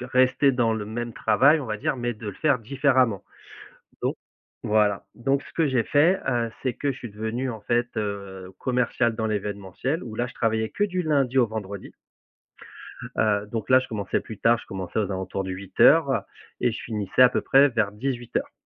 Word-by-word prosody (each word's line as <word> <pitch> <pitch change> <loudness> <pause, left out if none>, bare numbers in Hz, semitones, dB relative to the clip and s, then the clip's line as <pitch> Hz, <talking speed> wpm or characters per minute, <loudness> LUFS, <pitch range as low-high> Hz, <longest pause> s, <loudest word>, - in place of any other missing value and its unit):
rester 130 +2 +3
dans 115 -3 +1
le 105 - -4
même 120 +2 -5
travail, 140 +8 +4
on - - -5
va 110 -1 -3
dire, 130 - -1
mais 120 0 -2
de 110 -1 -10
le - - -6
faire 145 -5 +2
différemment» 130 -3 +1 0.8
donc - - -1 0.5
voilà, 105 -2 +2
donc 135 +3 0
ce - - -15
que 165 -2 +1
j'ai 130 -3 +2
fait, 165 +6 +3
heu, 120 -3 0
c'est 130 -3 -1
que 140 -1 -1
je 130 - -11
suis 120 - -8
devenu, 110 +5 -3
en 110 -3 -7
fait, 120 +2 -1
heu, 100 -3 -4
commercial 125 -2 0
dans 110 - -1
l'événementiel, 105 - -3
où 115 -3 -8
là, 120 +2 -1
je - - -13
travaillais 110 -1 0
que 205 - 0
du 185 -3 -1
lundi 140 -5 +1
au 120 - +5
vendredi. 100 -3 -6 1.3
Heu 105 -1 +1
donc 115 -1 -4
là, 130 - +7
je 130 - -6
commençais 100 -3 -2
plus 110 - -9
tard. 120 +1 +4
Je - - -13
commençais 95 +2 -4
aux 100 -2 -1
alentours 95 +1 -3
de 95 - -4
8:00, 100 - +4
heu - - +2 0.4
et 120 - +2
je 110 - -6
finissais 105 0 -1
à 125 - +9
peu - - -1
près 140 +1 +5
vers 110 -4 0
18:00. 120 +2 -3
115 Hz, 205 wpm, -25 LUFS, 105-130 Hz, 1.3 s, à